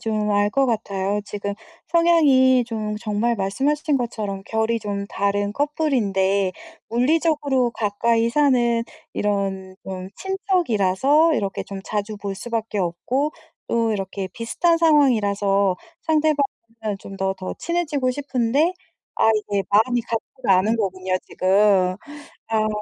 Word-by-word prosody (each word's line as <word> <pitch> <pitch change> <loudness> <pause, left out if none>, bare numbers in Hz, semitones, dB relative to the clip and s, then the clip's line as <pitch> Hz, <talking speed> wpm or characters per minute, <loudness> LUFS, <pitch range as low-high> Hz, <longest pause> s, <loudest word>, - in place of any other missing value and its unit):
좀 215 -1 -1
알 205 0 +2
것 270 +4 +2
같아요. 205 -3 -1
지금 200 -1 -4 0.3
성향이 290 -7 +4
좀 215 -2 -3
정말 220 +2 -1
말씀해 200 +10 0
주신 300 -1 0
것처럼 210 -5 -4
결이 220 +1 0
좀 200 -1 -4
다른 200 0 -1
커플인데 205 -10 +1 0.4
물리적으로 280 0 +2
가까이 230 +2 +1
사는 240 -5 +3 0.3
이런 195 -2 -2
좀 185 -1 -6
친척이라서 315 - +2
이렇게 195 -1 -2
좀 195 -1 -7
자주 210 0 -3
볼 200 -1 -4
수밖에 225 -1 -3
없고 240 - -1 0.3
또 230 -1 +1
이렇게 195 -1 -4
비슷한 330 +9 +1
상황이라서 205 - +3 0.3
상대방은 310 -2 +2 0.5
좀 195 0 -10
더 190 0 0
더 185 -1 -6
친해지고 305 -7 -1
싶은데 275 +4 +1 0.4
아 - - +4
이게 205 -2 -1
마음이 230 +4 +3
가지가 225 -3 0
않는 215 +4 +1
거군요 185 -3 -2
지금. 190 -1 +3 0.5
아 215 -1 +1
220 Hz, 275 characters per minute, -22 LUFS, 200-270 Hz, 0.5 s, 성향이